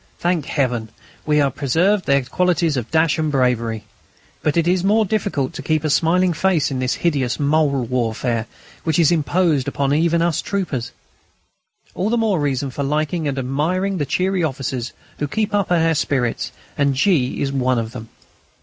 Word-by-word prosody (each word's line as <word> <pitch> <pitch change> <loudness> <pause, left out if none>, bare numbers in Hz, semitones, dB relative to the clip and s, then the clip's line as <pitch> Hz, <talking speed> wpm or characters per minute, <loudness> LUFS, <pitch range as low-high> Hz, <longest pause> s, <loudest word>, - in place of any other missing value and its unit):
Thank 170 -4 -1
Heaven! 125 -6 -1 0.4
we 150 0 +3
have 140 -3 +2
preserved 180 +9 +1
their 140 -1 +3
qualities 170 +2 +1
of 120 -3 -3
dash 160 0 +2
and 155 -1 0
bravery. 115 -5 0 0.6
But 150 +1 0
it 170 0 +2
is 180 0 +2
more 215 +3 +3
difficult 190 -10 -1
to - - -6
keep 155 -1 0
a 155 - 0
smiling 175 +4 +3
face 165 -4 +1
in 130 - -2
this 125 -1 0
hideous 140 -7 +1
mole 145 -2 +2
warfare, 115 -1 -1 0.4
which 160 -3 0
is 165 -2 +4
imposed 155 -2 +1
even 155 +4 +1
upon - - +3
us 165 - -1
troopers. 155 - -3 1.0
All 195 - -1
the 240 - +1
more 215 -6 +1
reason 140 -2 -1
for 140 - -5
liking 155 +3 -1
and 140 -1 -2
admiring 165 +9 -1
the 145 - -1
cheery 185 +2 0
officers 130 -4 -3 0.3
who 145 - -1
keep 215 +6 -2
our 175 -5 +2
spirits 130 -5 -1
up, - - -24
and 140 -1 +2
G. 140 -4 +1
is 135 - -1
one 130 -2 +1
of 115 -1 -2
them. 115 -2 -9
150 Hz, 175 wpm, -20 LUFS, 130-175 Hz, 1.0 s, is